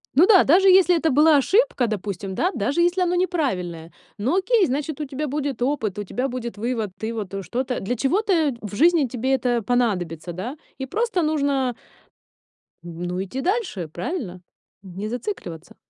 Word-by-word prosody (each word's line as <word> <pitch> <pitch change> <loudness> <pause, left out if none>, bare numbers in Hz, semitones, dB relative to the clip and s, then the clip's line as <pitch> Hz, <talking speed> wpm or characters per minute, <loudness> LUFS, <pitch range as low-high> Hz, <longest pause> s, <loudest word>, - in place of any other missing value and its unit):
Ну 315 +7 +7
да, 380 -3 +7
даже 380 +6 +5
если 365 -1 +6
это 320 0 +1
была 300 +3 +5
ошибка, 400 - +2
допустим, 200 -2 -4
да, 345 - +1
даже 270 +10 0
если 350 +2 +2
оно 355 -1 +1
неправильное, 185 - -2 0.3
ну, 250 - 0
окей, 405 +1 +3
значит 285 +2 -3
у 300 - -2
тебя 285 +2 -4
будет 285 -3 -3
опыт, 245 -7 -1
у - - -2
тебя 250 +7 -2
будет 240 -3 -5
вывод, 225 -2 -2
ты 220 +1 -4
вот 210 -4 -5
что-то 250 +7 -2
для 220 +6 -2
чего-то 325 - +1
в 210 -1 -7
жизни 330 +3 +4
тебе 255 +2 0
это 245 -2 0
понадобится, 185 -8 -1
да? 235 - -5 0.2
И 265 - -4
просто 445 - 0
нужно 280 -5 0 1.1
ну, 175 +2 -4
идти 255 +8 -5
дальше, 360 - -1
правильно? 180 - -5 0.4
Не 195 +3 -6
зацикливаться. 225 - -6
260 Hz, 165 wpm, -23 LUFS, 205-325 Hz, 1.1 s, Ну